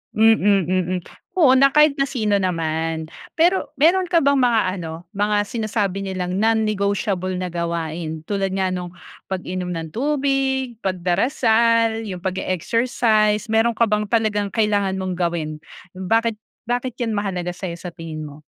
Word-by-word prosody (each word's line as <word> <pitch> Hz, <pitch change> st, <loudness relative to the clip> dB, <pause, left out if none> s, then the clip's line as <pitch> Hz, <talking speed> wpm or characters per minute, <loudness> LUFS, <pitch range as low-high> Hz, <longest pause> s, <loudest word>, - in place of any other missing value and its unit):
mm, 210 Hz, -3 st, +4 dB
mm. 185 Hz, 0 st, 0 dB, 0.4 s
Oo 265 Hz, -5 st, +6 dB
na 275 Hz, +1 st, +5 dB
kahit 300 Hz, 0 st, +5 dB
na 275 Hz, -, +1 dB
sino 220 Hz, -7 st, 0 dB
naman. 165 Hz, -3 st, -1 dB, 0.3 s
Pero 355 Hz, +3 st, +3 dB
meron 355 Hz, +5 st, +4 dB
ka 340 Hz, -1 st, +3 dB
bang 280 Hz, -2 st, +3 dB
mga 240 Hz, -3 st, +3 dB, 0.2 s
ano, 165 Hz, 0 st, -7 dB
mga 205 Hz, 0 st, +1 dB
sinasabi 205 Hz, -4 st, -2 dB
nilang 185 Hz, -1 st, -3 dB
non-negotiable 205 Hz, -3 st, 0 dB
na 185 Hz, -, -2 dB
gawain? 170 Hz, -2 st, -3 dB
Tulad 195 Hz, -2 st, -1 dB
nga 190 Hz, 0 st, 0 dB
nung 180 Hz, -1 st, -4 dB, 0.4 s
pag-inom 180 Hz, -1 st, -3 dB
ng 165 Hz, -2 st, -4 dB
tubig, 270 Hz, -2 st, 0 dB
pagdarasal, 225 Hz, +4 st, +2 dB
yung 190 Hz, -4 st, -6 dB
pag-e-exercise, 215 Hz, +4 st, +1 dB
meron 225 Hz, +1 st, +3 dB
ka 230 Hz, 0 st, +3 dB
bang 210 Hz, 0 st, +1 dB
talagang 210 Hz, -3 st, +1 dB
kailangan 205 Hz, -3 st, +1 dB
mong 185 Hz, -1 st, -3 dB
gawin? 170 Hz, -3 st, -2 dB, 0.4 s
Bakit 225 Hz, +5 st, +1 dB, 0.3 s
bakit 245 Hz, 0 st, -1 dB
yan 225 Hz, -3 st, -1 dB
mahalaga 180 Hz, -3 st, -2 dB
sa 185 Hz, +1 st, -5 dB
'yo 170 Hz, -, -8 dB
sa 180 Hz, -, -6 dB
tingin 155 Hz, -2 st, -7 dB
mo? 145 Hz, 0 st, -11 dB
205 Hz, 145 wpm, -21 LUFS, 180-230 Hz, 0.4 s, Oo